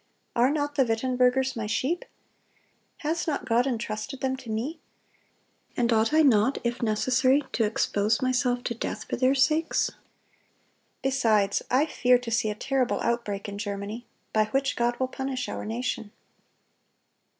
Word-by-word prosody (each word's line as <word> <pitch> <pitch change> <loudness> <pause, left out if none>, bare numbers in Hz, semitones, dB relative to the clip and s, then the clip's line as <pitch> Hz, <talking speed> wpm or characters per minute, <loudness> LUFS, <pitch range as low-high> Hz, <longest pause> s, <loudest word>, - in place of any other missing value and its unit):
Are 240 +2 +4
not 290 0 -1
the 280 -2 +3
Wittenbergers 255 +2 +1
my 225 -2 -3
sheep? 275 +10 -1 1.0
Has 325 +3 -1
not 295 -3 -1
God 245 +1 +2
entrusted 235 +1 -3
them 265 0 0
to 255 -3 -11
me? 250 +9 -3 1.0
And 235 -1 +2
ought 220 +3 +2
I 315 +1 +5
not, 250 -1 +4
if 240 +1 -2
necessary, 255 +5 +2
to 225 - +1
expose 210 0 +1
myself 250 -1 +1
to 235 - -2
death 220 -1 -4
for - - -3
their 260 +1 +3
sakes? 305 +5 +2 1.1
Besides, 225 -7 +2
I 265 +4 +3
fear 250 -5 +3
to 245 -1 -7
see 225 -1 +1
a 210 - -3
terrible 265 +2 0
outbreak 220 -4 -2
in 200 0 -6
Germany, 205 +2 -5 0.3
by 215 0 +3
which 270 +4 0
God 240 0 0
will 260 - +1
punish 265 -1 -4
our - - -5
nation." 225 -1 -3
245 Hz, 150 wpm, -27 LUFS, 220-265 Hz, 1.1 s, I